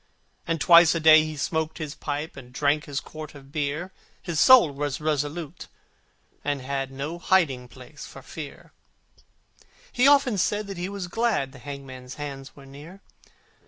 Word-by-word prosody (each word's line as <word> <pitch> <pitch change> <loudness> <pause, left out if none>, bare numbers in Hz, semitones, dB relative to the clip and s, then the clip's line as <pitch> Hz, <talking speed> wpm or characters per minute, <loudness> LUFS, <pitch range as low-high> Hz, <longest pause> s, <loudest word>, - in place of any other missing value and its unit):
And 165 -1 -1
twice 170 +1 +7
a - - 0
day 155 0 +7
he 155 -1 -6
smoked 160 +3 -2
his 150 -2 -5
pipe, 150 +1 -5
And 125 -2 -12
drank 145 +3 +1
his 145 -1 -3
quart 155 0 -10
of 135 -1 -14
beer: 155 +4 -3 0.3
His 170 -4 -3
soul 245 - +7
was 145 0 -3
resolute, 155 +2 -3 0.8
and 145 -1 -1
held 135 0 -3
No 140 +6 -6
hiding 150 -10 +1
place 120 - -12
for - - -12
fear; - - -10 1.2
He 250 +2 +3
often 275 -7 +4
said 210 +4 0
that 195 -2 -7
he 180 +2 -3
was 200 -2 -5
glad 210 - 0
The 130 - -14
hangman's 130 -2 -9
day 145 -1 -5 0.2
was 140 -1 -14
near. 150 +8 -12
150 Hz, 160 wpm, -25 LUFS, 140-175 Hz, 1.2 s, twice